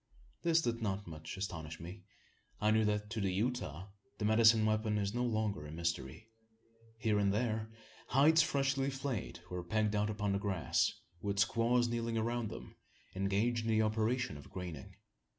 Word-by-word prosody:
This 165 -1 +3
did 115 -1 -1
not 100 -1 -2
much 80 +3 -8
astonish 80 -5 -5
me. 90 +5 -8 0.6
I 105 0 +3
knew 110 0 +4
that, 105 0 -1
to 110 -1 -2
the 95 -1 +1
Utah, 100 - -2 0.3
the 105 - -2
medicine 110 0 +6
weapon 110 0 +1
is 100 0 -1
no 120 +1 0
longer 110 -9 -1
a - - -9
mystery. 85 +4 -3 0.7
Here 110 -3 +1
and 100 -1 +3
there, 110 0 -1 0.4
hides 155 +5 +5
freshly 135 -2 +1
flayed 135 -5 -4
were 90 -1 -3
pegged 110 +3 0
out 105 +1 +1
upon 105 -1 -1
the 100 - +1
grass, 95 -4 +1 0.3
with 100 -1 -2
squaws 120 +2 +3
kneeling 115 -1 -1
around 115 0 -1
them, - - -9 0.4
engaged 105 +5 0
in - - -1
the 110 0 +3
operation 110 - 0
of 70 - -12
graining. 90 -7 -7
110 Hz, 170 wpm, -34 LUFS, 100-115 Hz, 0.7 s, medicine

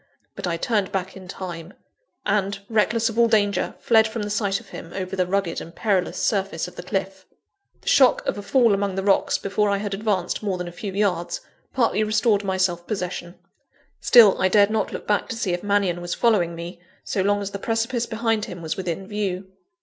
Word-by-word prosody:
But - - -4
I 170 -1 -1
turned 205 0 0
back 190 -1 -3
in 190 -1 -11
time; 175 -2 -7 0.5
and, 200 -1 0
reckless 225 +1 +2
of 225 +1 -2
all 235 - +6
danger, 205 -3 +1
fled 220 -2 +4
from 220 0 -4
the 205 - -4
sight 200 -2 0
of - - -17
him, 165 - -9
over 190 0 -4
the 185 -1 0
rugged 195 -3 -1
and 165 - -10
perilous 195 -5 0
surface 195 -5 -1
of 180 - -12
the - - -6
cliff. 190 0 -4 0.5
The - - -20
shock 260 -2 +5
of - - 0
a 205 - -6
fall 230 +1 +3
among 200 -1 -1
the 195 - -2
rocks, 200 0 +2
before 205 +1 0
I 200 - +2
had 200 0 -3
advanced 195 -3 -1
more 200 -3 -1
than 180 0 -5
a - - -6
few 195 +3 -6
yards, 200 - -1 0.3
partly 230 -4 +2
restored 215 -1 +2
my 190 -1 -1
self 175 -2 0
possession. 180 -3 -4 0.6
Still, 220 -6 +6
I 185 - +4
dared 200 +2 +4
not 215 -2 0
look - - -6
back 205 -1 0
to - - -3
see 200 -6 -1
if 175 - -2
Mannion 200 -4 +1
was 175 0 -3
following 190 -8 +2
me, 170 +1 -8 0.2
so 195 - -1
long 205 +1 +2
as 200 -1 -4
the 200 - -5
precipice 230 +2 -1
behind 225 -1 0
him 175 -1 -8
was 160 - -2
within 185 0 -4
view. 195 -2 -3
200 Hz, 215 wpm, -23 LUFS, 185-215 Hz, 0.6 s, all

